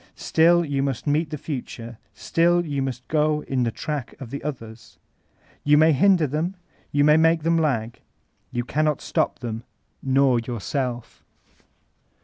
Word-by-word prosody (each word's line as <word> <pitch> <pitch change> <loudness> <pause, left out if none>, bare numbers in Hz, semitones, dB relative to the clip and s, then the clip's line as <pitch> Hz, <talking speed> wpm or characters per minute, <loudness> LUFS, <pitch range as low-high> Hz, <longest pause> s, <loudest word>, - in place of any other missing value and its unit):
Still 170 +1 +3
you 140 -2 -1
must 135 -4 -2
meet 150 +2 +1
the 150 - -4
future; 120 -5 -7 0.2
still 170 +10 +2
yoa 145 -4 -3
must 130 -2 -4
go 150 -1 +1
in 130 -2 -1
the 120 - +1
track 145 +2 -5
of 125 -4 -9
the 140 - -5
others. 115 -6 -8 0.7
You 150 0 +5
may 160 +1 +6
hinder 170 +2 +4
tiiem, 160 +7 -2 0.4
you 145 0 +2
may 150 +1 +6
make 165 0 +3
them 165 0 +2
lag; 120 -8 -1 0.5
you 120 0 -2
cannot 150 +1 0
stop - - -1
them, 115 -1 -5 0.4
nor 135 -2 +3
yourself. 120 +1 -4
145 Hz, 150 wpm, -23 LUFS, 125-155 Hz, 0.7 s, may